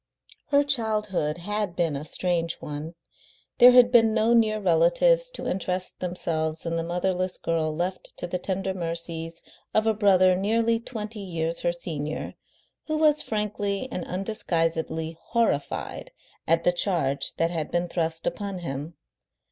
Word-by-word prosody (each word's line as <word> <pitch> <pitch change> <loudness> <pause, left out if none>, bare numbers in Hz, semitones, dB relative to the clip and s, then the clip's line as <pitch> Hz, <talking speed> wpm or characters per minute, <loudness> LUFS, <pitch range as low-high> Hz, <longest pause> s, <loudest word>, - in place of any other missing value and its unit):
Her 285 0 +4
childhood 215 - 0
had 205 0 -2
been 165 -5 0
a 140 +2 -5
strange 170 0 -1
one. 150 +3 -6 0.6
There 245 - +10
had 245 -1 +7
been 225 -3 +5
no 225 +2 +3
near 215 -2 +3
relatives 200 - +3
to - - -6
interest 185 0 -2
themselves 160 -3 -2
in 165 0 -1
the 165 - -1
motherless 180 +2 -1
girl 165 -1 -1
left 175 +4 -4
to - - -3
the 180 +1 -3
tender 190 +1 -2
mercies 165 -1 -4 0.3
of 215 - +3
a 220 - +3
brother 185 -3 +4
nearly 225 +4 +1
twenty 220 -2 -6
years 170 -4 -3
her 175 - +1
senior, 155 -3 -4 0.5
who 310 0 0
was 305 -1 +4
frankly 210 0 -2
and 180 - -3
undisguisedly 165 -4 -2
horrified 230 -11 -1 0.4
at 165 +1 +3
the 175 - +4
charge 140 -7 0
that 165 +1 +1
had 160 -3 -2
been 175 0 0
thrust 165 -1 -2
upon 200 -2 -3
him. 150 -1 -5
180 Hz, 150 wpm, -26 LUFS, 165-215 Hz, 0.6 s, There